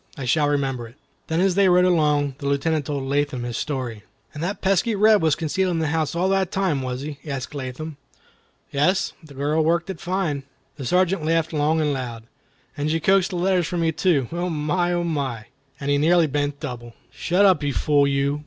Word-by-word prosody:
I 135 - -5
shall 145 +4 +2
remember 135 -4 -1
it." 115 - -17 0.3
Then 160 +1 0
as 190 0 +3
they 195 0 +4
rode 180 0 +5
along, 150 -5 +2
the 140 - -4
Lieutenant 140 +1 0
told 140 -2 -2
Latham 140 -2 -1
his 120 -1 -4
story. 130 -7 -3 0.3
"And 150 - -7
that 190 +4 -2
pesky 195 +4 +1
Reb 215 0 +5
was 160 -3 +3
concealed 185 +4 -1
in 175 - -1
the 160 -2 0
house 160 -1 -1
all 180 +2 +1
the 195 0 +2
time, 185 -7 0
was 130 0 -4
he?" 145 0 -6
asked 140 -2 -5
Latham. 140 +2 -6 0.7
"Yes; 185 +8 +1
the 145 -3 -14
girl 150 +3 +1
worked 170 +3 +1
it 175 - -9
fine." 175 -6 -1 0.4
The 135 -4 -5
Sergeant 180 +2 +2
laughed 165 0 0
long 155 +1 +1
and 150 -2 +1
loud. 120 -4 -5 0.5
"And 145 +1 -2
she 165 +1 +1
coaxed 190 +3 +3
the 185 - -5
letters 180 -1 +1
from 175 -1 -1
you 165 - +2
too. 155 -6 +1
Oh, 175 +2 -2
my! 165 +3 0
Oh, 175 0 0
my!" 135 -9 -2 0.3
And 140 0 -2
he 145 - +3
nearly 170 +2 +4
bent 145 -1 -2
double. 120 -5 -7 0.2
"Shut 180 +8 +2
up, 190 -4 +4
you 145 -1 0
fool 145 +1 +2
you!" 140 +1 0
155 Hz, 210 wpm, -23 LUFS, 140-175 Hz, 0.7 s, rode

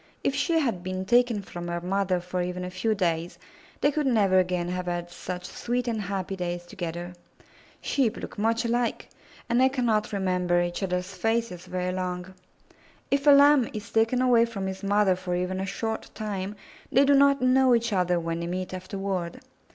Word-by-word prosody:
If - - +1
she 325 +4 +1
had 240 - 0
been 185 +1 -4
taken 240 -1 +3
from 175 -2 -7
her 170 0 -2
mother 185 +1 0
for 180 +1 -3
even 180 0 -3
a 180 - -6
few 215 +4 0
days, 170 -3 -1 0.4
they 290 - +4
could 295 -1 0
never 200 -6 +4
again 180 -1 0
have 180 0 -3
had 175 0 -3
such 180 0 -6
sweet 245 +5 -3
and 225 -2 -1
happy 195 -1 -3
days 175 -1 -4
together. 175 0 -6 0.7
Sheep 260 -6 0
look - - -8
much 225 +2 +1
alike, 235 0 -1 0.4
and 240 +1 +2
they 260 - +5
cannot 235 -5 0
remember 180 -3 +1
each 175 +2 -2
other's 180 0 -2
faces 225 -4 -1
very 180 0 -2
long. 180 0 -4 0.8
If 280 +1 +1
a - - +10
Lamb 285 -3 +6
is 215 0 -7
taken 225 +3 +2
away 240 -2 +5
from 210 -5 -5
his 190 0 -4
mother 200 -1 +3
for 180 -1 -3
even 180 +1 -2
a 190 - -3
short 220 +3 -3
time, 205 -2 -4 0.4
they 275 +3 +5
do 285 - +5
not 280 0 +5
know 255 0 +4
each 230 -1 0
other 180 -2 +2
when 165 0 -3
they 170 - -3
meet 185 +1 -4
afterward. 185 -1 -4
195 Hz, 190 wpm, -26 LUFS, 180-235 Hz, 0.8 s, a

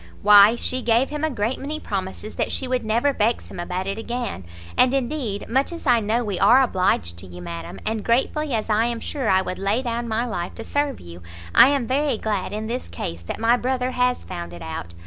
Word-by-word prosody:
"Why 205 +2 +8
she 255 +2 -2
gave 240 +3 +2
him 300 0 -4
a 315 - +2
great 235 -1 -2
many 300 +3 -4
promises 195 -2 -5
that - - -2
she 265 - -2
would 255 0 -1
never 235 +6 +1
vex 230 0 0
him - - -8
about 180 +2 -3
it 195 +2 -3
again; 235 - -4 0.3
and 250 0 +4
indeed, 250 -6 -2
much 265 +6 +1
as 335 -1 -8
I 245 -3 +5
know 225 +3 0
we 200 -5 -3
are 260 +3 +6
obliged 180 - 0
to 95 - -9
you, 90 0 -10
madam, 85 +1 -7
and 220 -1 -2
gratefully 275 +5 +1
as 215 - -2
I 220 +1 +2
am 235 -1 -2
sure 265 -3 -3
I 190 0 +4
would 185 - -5
lay 200 +6 0
down 235 -1 -2
my 225 +1 0
life 175 -7 -4
to - - -7
serve 285 -1 -1
you, 85 0 -11 0.3
I - - +9
am 275 -3 +1
very 275 0 +1
glad 210 -3 -2
in 215 +1 -4
this 240 +3 -4
case 85 0 -6
that 85 - -6
my 230 +2 +4
brother 255 0 -1
has 250 0 +1
found 85 0 -7
it 85 - -9
out. 85 +1 -6
230 Hz, 230 wpm, -23 LUFS, 195-255 Hz, 0.3 s, I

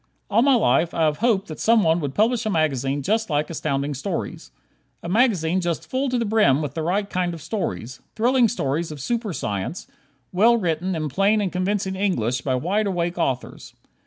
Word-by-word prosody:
All 225 - +4
my 275 +1 +5
life, 165 - +2
I 165 - +1
have 150 -1 +2
hoped 220 -4 +1
that 155 - -7
someone 200 -8 +3
would 145 -4 -4
publish 230 +2 +2
a 215 - -1
magazine 140 - 0
just 220 +6 0
like 150 +1 -1
Astounding 140 -2 -2
Stories. 135 0 -5 0.5
A - - -5
magazine 185 -5 +2
just 170 -3 -3
full 265 +1 -1
to 250 - 0
the 235 - 0
brim 205 -11 +3
with 150 -3 -4
the 160 - -3
right 195 +5 0
kind 180 -3 -2
of 165 - -11
stories; 125 - -4 0.2
thrilling 245 +2 +3
stories 165 - -2
of 150 - -8
super 230 - -2
science, 120 - -4 0.5
well 225 +6 +4
written 180 -1 -1
in 155 -1 -2
plain 200 +8 +2
and 195 -3 -1
convincing 190 +1 -1
English 130 - 0
by 130 -2 -1
wide 195 +10 0
awake 175 -2 -2
authors. 130 -6 -3
175 Hz, 190 wpm, -23 LUFS, 150-215 Hz, 0.5 s, my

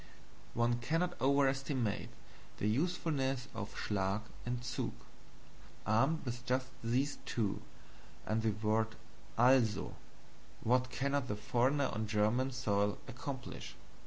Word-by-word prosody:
One 120 0 +2
cannot 165 +8 +1
overestimate 135 -5 +2 0.5
the 105 - 0
usefulness 135 -1 +1
of 105 -2 -4
SCHLAG 100 0 0 0.3
and 120 0 0
ZUG. 125 +1 -2 0.9
Armed 135 +10 +3 0.2
just 130 0 0
with 115 - -2
these 135 +4 +1
two, 105 -5 0 0.6
and 110 +1 +1
the 110 - +2 0.2
word 110 +1 +2 0.4
ALSO, 120 -3 +4 0.7
what 125 +2 +3
cannot 140 +1 0
the 105 - -1
foreigner 130 +6 +2
on 110 0 -1
German 110 +5 +2
soil 105 -6 +1
accomplish? 130 +1 -6
125 Hz, 110 wpm, -35 LUFS, 110-135 Hz, 0.9 s, ALSO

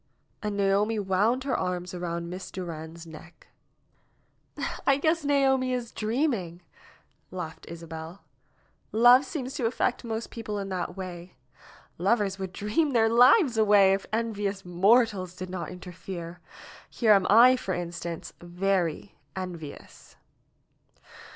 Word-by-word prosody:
And 210 -1 -3
Naomi 200 +3 +2
wound 210 +6 +1
her 275 - -1
arms 180 -1 -3
around 170 -1 -4
Miss 185 +2 -7
Durand's 165 -2 -7
neck. 160 +1 -14 1.4
"I 275 - +5
guess 315 +2 +1
Naomi 265 -3 +2
is 245 -2 -3
dreaming," 215 - -2 0.7
laughed 170 -4 -7
Isabel. 165 +2 -9 0.7
"Love 245 +4 +6
seems 265 -2 -5
to 255 -5 0
affect 245 +1 -1
most 225 -1 -4
people 215 -3 -5
in 195 -1 -4
that 180 -1 -4
way. 180 -1 -8 0.6
Lovers 195 0 +1
would 190 -1 -4
dream 220 - 0
their 225 -2 +4
lives 245 - +5
away 205 -3 +5
if 195 - -3
envious 205 -3 -2
mortals 190 0 +2
did 185 0 -7
not 185 -2 -4
inter 180 0 -9
fere. 175 -1 -8 0.5
Here 225 -3 +2
am 195 -3 +5
I, 240 +5 +7
for 195 -7 -3
instance, 170 -1 -6
very 180 0 -2 0.2
envious." 175 -6 -8
195 Hz, 125 wpm, -27 LUFS, 175-230 Hz, 1.4 s, I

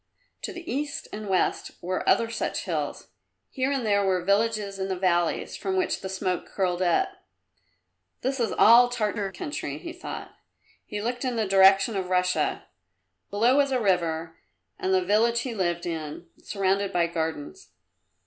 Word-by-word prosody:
To - - -4
the 350 -3 -9
east 285 +3 -3
and 210 -1 -6
west 185 -1 0
were 185 +1 -2
other 230 - +4
such 225 - -2
hills; 155 - -3 0.4
here 260 +1 0
and 270 -4 -1
there 200 -1 +3
were 185 -2 +1
villages 205 -1 +1
in 190 - -1
the 190 - -1
valleys 175 -2 0
from 380 0 -2
which 370 - 0
the 190 - -5
smoke 185 -1 -2
curled 180 -2 -1
up. 185 - +2 1.1
"This 265 +1 -1
is 230 -4 +1
all 240 +2 +7
Tartar 210 -4 -2
country," 145 -4 -5
he 335 - -7
thought. 355 - -7 0.6
He 205 0 -4
looked 245 +2 -2
in 255 -2 -1
the 220 -2 +1
direction 195 +2 +5
of 190 -2 -2
Russia 180 0 +1 0.6
below 235 +6 +3
was 280 -1 +3
a 260 - +2
river, 170 -5 0 0.4
and 190 - -1
the 185 -1 +2
village 230 +4 +3
he 255 - -4
lived 175 -4 -1
in, 160 -1 -5 0.2
surrounded 195 0 0
by 175 -2 +2
gardens. 160 - -4
195 Hz, 165 wpm, -26 LUFS, 180-235 Hz, 1.1 s, all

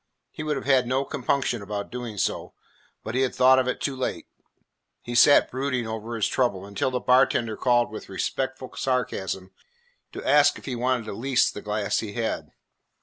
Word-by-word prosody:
He - - -7
would 155 -1 -1
have 135 - -5
had 130 -3 +3
no 130 +2 0
compunction 130 -3 -1
about 100 0 -5
doing 120 -4 -6
so, - - -2 0.5
but 110 - -5
he 130 - +1
had 130 - 0
thought 130 +1 +6
of 130 - 0
it 130 - -1
too 140 - -2
late. 130 - -3 0.8
He 120 - -6
sat 130 +4 +6
brooding 130 -2 -2
over 110 +1 -5
his 110 - +1
trouble 100 -7 0
until 100 +5 -1
the 125 -1 -2
bartender 125 -3 +3
called 120 -2 +2
with 110 - -8
respectful 130 +6 -3
sarcasm 95 -7 -2 0.6
to - - -7
ask 145 0 +5
if - - -13
he 130 - -3
wanted 125 -1 0
to 110 - -5
lease 130 +3 +1
the 105 - -8
glass 105 -1 -1
he 105 -2 -5
had. 115 0 -3
125 Hz, 190 wpm, -25 LUFS, 110-130 Hz, 0.8 s, thought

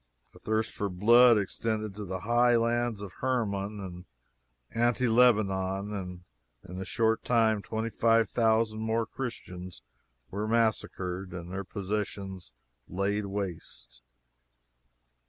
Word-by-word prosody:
The - - -15
thirst 110 +1 -1
for 100 - -3
blood 115 +6 +6
extended 110 +1 -2
to 105 +1 -7
the 95 0 -4
high 120 +3 +3
lands 115 -2 0
of 100 - -7
Hermon 105 -5 -1
and 90 -2 -8 0.7
Anti 120 +2 +1
Lebanon, 105 -4 +2
and 90 -3 -6 0.4
in 90 +2 -6
a - - -4
short 115 +2 +1
time 110 -3 +2
twenty 110 +2 -3
five 115 -1 +3
thousand 110 0 +2
more 110 +1 0
Christians 90 - -7 0.5
were 105 +2 -2
massacred 95 -5 -1
and 85 0 -7
their 95 +1 -3
possessions 95 - -4 0.4
laid 100 +2 -1
waste. 95 -11 -6
105 Hz, 120 wpm, -29 LUFS, 95-115 Hz, 0.7 s, blood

